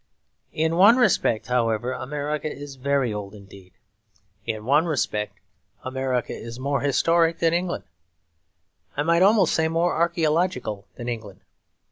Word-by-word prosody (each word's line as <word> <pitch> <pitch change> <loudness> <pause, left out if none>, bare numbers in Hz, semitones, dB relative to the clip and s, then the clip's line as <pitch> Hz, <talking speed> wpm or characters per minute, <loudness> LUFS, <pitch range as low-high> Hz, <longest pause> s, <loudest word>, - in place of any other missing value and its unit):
In 160 +1 +1
one 205 +7 +7
respect, 180 - +2
however, 120 -1 0
America 150 +3 -3
is 140 -1 -9
very 135 -3 0
old 105 0 -6
indeed. 100 -2 -15 0.8
In 110 -2 -3
one 145 +6 +3
respect 105 -8 -2 0.5
America 130 -1 -2
is 115 +1 -8
more 140 +1 -1
historic 165 +4 +2
than 165 0 +2
England; 175 +1 -1 1.1
I 145 - +1
might 170 +2 +3
almost 195 -3 +4
say 160 -1 +2
more 165 +2 +1
archaeological 165 - 0
than 120 - -7
England. 110 -5 -6
140 Hz, 130 wpm, -24 LUFS, 115-165 Hz, 1.1 s, one